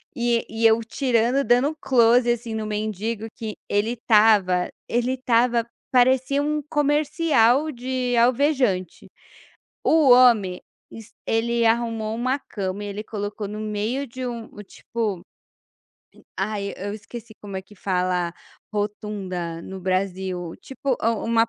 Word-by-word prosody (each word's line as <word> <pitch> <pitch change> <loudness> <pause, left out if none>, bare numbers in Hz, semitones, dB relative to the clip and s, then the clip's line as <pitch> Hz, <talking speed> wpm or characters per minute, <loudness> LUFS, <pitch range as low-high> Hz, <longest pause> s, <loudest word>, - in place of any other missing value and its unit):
e 235 -1 +1
e 225 +1 -2
eu 220 +1 +4
tirando 245 +2 +1
dando 250 +7 +2
close 240 -2 +4
assim 235 -1 -3
no 220 -1 -3
mendigo 215 +1 -3
que 220 -2 -6
ele 210 +4 0
estava 210 -6 +3 0.2
ele 245 +2 0
estava, 240 -2 +2 0.2
parecia 260 +2 +3
um 300 0 -1
comercial 295 -2 +2
de 250 -1 -2
alvejante. 240 - +1 0.7
O 310 -4 +4
homem, 225 -8 +5 0.3
es 225 -1 -12 0.2
ele 235 +1 +1
arrumou 225 -1 0
uma 255 +4 0
cama 200 -3 -5
e - - -5
ele 205 +1 -5
colocou 205 -1 -5
no 210 +1 -6
meio 215 +6 -2
de 255 +2 -6
um 235 -2 -5 0.2
tipo, 210 -3 -4 0.9
m - - -20
ai 200 0 -2
eu 200 +2 -5
esqueci 225 +1 -10
como 200 -2 -6
é - - -8
que 210 - -18
fala 180 -2 -1 0.4
rotunda 195 -5 -3
no 190 0 -8
Brasil 185 -2 -2
tipo, 270 -1 -3
um 230 0 0
225 Hz, 130 wpm, -23 LUFS, 205-250 Hz, 0.9 s, homem